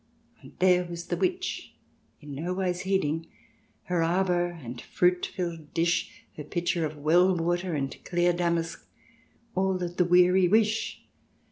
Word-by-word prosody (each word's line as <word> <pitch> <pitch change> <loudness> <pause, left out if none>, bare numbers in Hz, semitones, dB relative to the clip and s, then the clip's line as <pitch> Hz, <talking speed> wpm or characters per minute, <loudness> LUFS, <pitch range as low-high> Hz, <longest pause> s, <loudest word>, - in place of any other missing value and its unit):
" - - -34
And - - -14
there 180 -1 +4
was 170 -1 -7
the - - -2
Witch, 370 0 -2 0.5
in 145 -1 -9
no 170 +6 -3
wise 180 -2 -1
heeding; 165 -4 0 0.6
Her 180 -2 0
arbour 175 +1 +2
and 125 -9 -8
fruit 180 0 +1
filled 170 -5 -6
dish, 175 +9 0
Her 150 - -5
pitcher 175 +1 -1
of 150 0 -10
well 175 +5 +4
water, 175 +1 -1
and 135 -2 -2
clear 175 0 +2
damask 170 -1 -1 0.4
— 235 0 -36
All 190 0 +1
that 175 -1 -5
the 180 - +4
weary 180 +1 +5
wish. 220 +2 +1
175 Hz, 155 wpm, -27 LUFS, 165-185 Hz, 0.6 s, weary